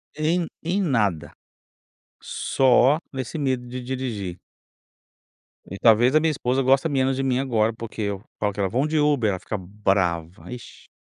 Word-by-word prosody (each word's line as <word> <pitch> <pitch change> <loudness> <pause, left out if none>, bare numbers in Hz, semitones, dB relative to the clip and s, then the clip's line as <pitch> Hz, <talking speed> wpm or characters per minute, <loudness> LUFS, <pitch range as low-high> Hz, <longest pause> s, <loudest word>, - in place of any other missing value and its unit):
Em 165 +3 +1 0.2
em 185 +5 -1
nada. 105 - 0 0.9
Só 135 +3 +3
nesse 130 +4 -4
medo 130 -4 -1
de 125 +1 -6
dirigir. 120 -8 -4 1.3
E 100 - -6
talvez 120 +5 +5
a - - +7
minha 160 0 +1
esposa 130 -2 0
gosta 135 +5 +3
menos 135 -1 +1
de 135 - -2
mim 130 -1 +1
agora, 115 -4 +1
porque 115 -1 -7
eu 100 0 -3 0.2
falo 105 -1 0
com 100 - -3
ela: 95 - +1
"Vamos 135 +9 0
de 160 - 0
Uber", 145 -7 +2
ela 95 -2 -2
fica 110 - -4
brava, 95 -4 0 0.2
vixe. 125 -1 -10
125 Hz, 165 wpm, -23 LUFS, 105-135 Hz, 1.3 s, a